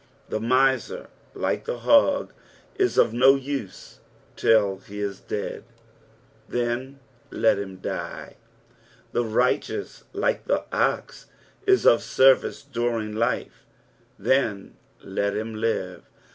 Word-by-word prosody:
The - - -2
miser 130 - +1 0.3
like - - -2
the 485 - -3
hog 285 -1 +3 0.4
is 385 -1 +1
of 110 - +4
no 130 +3 +6
use 135 -6 -6 0.4
till 100 -4 +3
he 105 +1 -10
is 100 -2 -3
dead— 105 - -5 0.9
then 120 +3 -2 0.3
let 110 -3 +2
him 95 -2 -6
die; - - -6 0.7
the 120 - +1
righteous 125 - -1
like - - -1
the - - 0
ox - - -1 0.4
is 385 -1 +4
of 115 - +6
service 130 +4 +3
during 120 -5 -2
life 115 +2 -2 0.2
— - - -36
then 115 -7 0 0.3
let 100 +1 -2
him 110 +1 -3
live. 110 -4 -2
120 Hz, 115 wpm, -25 LUFS, 105-135 Hz, 0.9 s, no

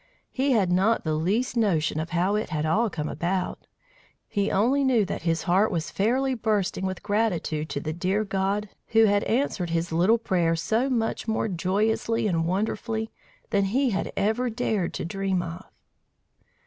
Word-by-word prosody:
He 270 +1 +1
had 195 -6 +2
not 195 +6 +2
the 155 - -1
least 200 +12 0
notion 165 -9 +1
of 160 +1 -3
how 180 +3 +1
it 210 +1 -1
had 155 -1 -1
all 215 +9 +2
come 155 -5 -4
about; 180 +3 -2 0.6
he 200 0 0
only 255 +8 +2
knew 245 -6 +3
that - - -4
his 165 -1 0
heart 190 +5 +3
was 165 -2 -2
fairly 260 +6 +1
bursting 210 -5 0
with 190 -1 -5
gratitude 180 -8 -1
to - - -2
the 155 +2 -4
dear 185 +5 0
God 195 +1 -1 0.2
who 225 0 +5
had 205 -1 +3
answered 220 -7 0
his 165 0 -1
little 180 +8 +4
prayer 175 -7 +1
so 220 +10 0
much 230 -3 -1
more 220 0 0
joyously 210 +5 0
and 165 -5 +1
wonderfully 220 +4 -2 0.4
than 200 -2 +2
he 250 +6 +1
had 195 - -2
ever 220 +5 +1
dared 220 -6 -1
to - - -3
dream 190 0 -1
of! 170 +1 -7
200 Hz, 175 wpm, -26 LUFS, 175-225 Hz, 0.6 s, who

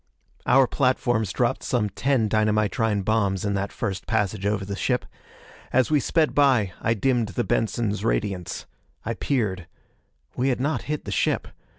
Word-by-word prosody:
Our 135 0 +6
platforms 120 -6 +1
dropped - - 0
some 115 -4 0
ten 120 +3 +1
dynamitrine 110 -1 +1
bombs 100 -3 +1
in 100 - 0
that 100 0 -2
first 95 -1 -4
passage 100 0 0
over 105 -1 -1
the 100 0 -4
ship. - - 0 0.7
As 130 +3 +2
we 150 - +4
sped 155 +3 +1
by, 125 -10 +3
I 115 +1 +1
dimmed 120 0 +1
the 100 - -2
Benson's 110 -2 -1
radiance. 90 +9 -2 0.4
I 115 - -1
peered. 105 -8 -1 0.7
We 130 +2 +1
had 125 - 0
not 145 +4 0
hit 150 -1 -2
the - - -5
ship. - - 0
110 Hz, 160 wpm, -24 LUFS, 100-125 Hz, 0.7 s, Our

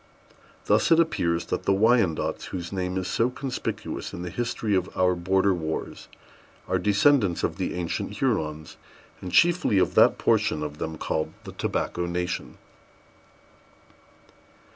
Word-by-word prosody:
Thus - - +3
it 165 - +6
appears 85 - +1
that - - -3
the 100 - +3
Wyandots, 110 -5 +2
whose 90 0 -6
name 90 -1 -2
is 95 -1 -2
so 115 +2 +1
conspicuous 130 0 -5
in 85 - -6
the 90 - -5
history 115 -1 -2
of 95 -1 +1
our 90 0 +3
border 95 +2 +2
wars, 80 -3 -4 0.6
are - - +1
descendants 105 -2 +3
of - - -1
the - - -2
ancient 90 +3 -3
Hurons, 80 - -2 0.4
and 90 - -6
chiefly 170 - +4
of 95 - +2
that - - +5
portion 75 - +1
of 75 0 -6
them 80 0 -4
called 80 0 -2
the - - -8
Tobacco 85 0 -2
Nation. 90 0 -3
95 Hz, 140 wpm, -25 LUFS, 85-110 Hz, 0.6 s, it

